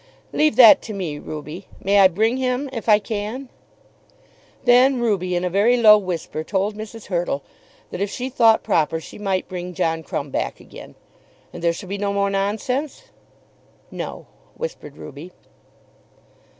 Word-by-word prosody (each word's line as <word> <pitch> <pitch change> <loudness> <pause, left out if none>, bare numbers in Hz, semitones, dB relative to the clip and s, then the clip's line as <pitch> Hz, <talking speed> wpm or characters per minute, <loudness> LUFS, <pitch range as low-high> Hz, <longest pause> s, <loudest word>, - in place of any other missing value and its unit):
"Leave 305 -6 +2
that 235 -3 +8
to 220 - -7
me, 170 -7 -4
Ruby. 155 +5 -8
May 200 +1 +2
I 195 - +8
bring 220 +7 0
him 260 +1 -1
if 230 -2 -4
I 210 - +7
can?" 220 +5 -5 1.2
Then 250 +1 +5
Ruby 195 -6 0
in 175 - -1
a - - +1
very 215 +6 +3
low 215 -3 +8
whisper 180 -5 -3
told 200 +4 -1
Mrs. 215 +1 -9
Hurtle, 170 -6 -2 0.5
that 180 - -5
if 200 - 0
she 250 +5 -4
thought 230 -4 +4
proper 160 0 +1
she 160 - -12
might 195 -2 -1
bring 180 -1 -6
John 165 -2 0
Crumb 140 -2 -5
back - - -3
again. - - -13 0.6
"And - - -8
there 170 - +3
shall 185 +3 -8
be 200 +2 -4
no 200 0 -1
more 200 0 0
nonsense?" 250 - -2 0.8
"No," - - -6 0.3
whispered 475 - -7
Ruby. 150 +5 -10
200 Hz, 160 wpm, -21 LUFS, 180-235 Hz, 1.2 s, that